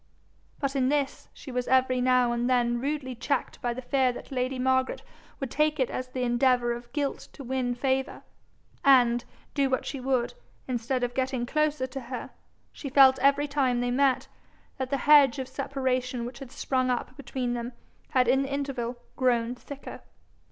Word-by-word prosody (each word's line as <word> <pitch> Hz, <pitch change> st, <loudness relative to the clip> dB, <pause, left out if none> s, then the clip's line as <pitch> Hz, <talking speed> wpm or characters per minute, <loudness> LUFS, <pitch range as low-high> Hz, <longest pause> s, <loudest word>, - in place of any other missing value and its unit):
But 275 Hz, -1 st, -2 dB
in 260 Hz, -1 st, +2 dB
this 285 Hz, -1 st, -1 dB
she 270 Hz, -, -10 dB
was 250 Hz, 0 st, -2 dB
every 255 Hz, -1 st, +3 dB
now 250 Hz, -1 st, +3 dB
and 240 Hz, +1 st, 0 dB
then 240 Hz, -1 st, +2 dB
rudely 280 Hz, -2 st, -2 dB
checked 270 Hz, +3 st, -2 dB
by 240 Hz, -, 0 dB
the 255 Hz, +2 st, -6 dB
fear 260 Hz, 0 st, +2 dB
that -, -, -10 dB
lady 255 Hz, 0 st, -1 dB
Margaret 260 Hz, 0 st, +1 dB, 0.4 s
would 270 Hz, -3 st, -4 dB
take 305 Hz, 0 st, +1 dB
it 260 Hz, -, +1 dB
as 255 Hz, -, -4 dB
the 255 Hz, 0 st, -3 dB
endeavour 240 Hz, 0 st, +2 dB
of 240 Hz, 0 st, -9 dB
guilt 285 Hz, -1 st, -2 dB
to 280 Hz, -, -9 dB
win 255 Hz, -1 st, -1 dB
favour; 265 Hz, +1 st, -1 dB, 0.6 s
and, 245 Hz, -4 st, +5 dB, 0.3 s
do 275 Hz, -2 st, +2 dB
what 260 Hz, -, 0 dB
she 275 Hz, -, -4 dB
would, 250 Hz, -2 st, 0 dB, 0.3 s
instead 250 Hz, 0 st, -1 dB
of 245 Hz, 0 st, -1 dB
getting 260 Hz, -2 st, -1 dB
closer 305 Hz, 0 st, 0 dB
to 260 Hz, +1 st, -6 dB
her, 250 Hz, 0 st, -7 dB, 0.4 s
she 280 Hz, -, -7 dB
felt 265 Hz, -1 st, +6 dB
every 280 Hz, +2 st, +3 dB
time 270 Hz, -4 st, +1 dB
they 245 Hz, 0 st, 0 dB
met, 265 Hz, 0 st, +2 dB, 0.5 s
that 260 Hz, -1 st, -2 dB
the 275 Hz, -, 0 dB
hedge 285 Hz, -1 st, +6 dB
of 260 Hz, -1 st, -4 dB
separation 255 Hz, -2 st, -2 dB
which 245 Hz, +1 st, -8 dB
had 270 Hz, -3 st, -9 dB
sprung 255 Hz, -1 st, 0 dB
up 250 Hz, +1 st, -2 dB
between 255 Hz, -3 st, -3 dB
them 240 Hz, +1 st, -4 dB, 0.4 s
had 255 Hz, -2 st, +3 dB
in 265 Hz, +2 st, +4 dB
the 275 Hz, 0 st, -3 dB
interval 270 Hz, -4 st, -2 dB, 0.2 s
grown 240 Hz, -2 st, +1 dB
thicker. 275 Hz, +3 st, -9 dB
255 Hz, 180 wpm, -27 LUFS, 245-275 Hz, 0.6 s, felt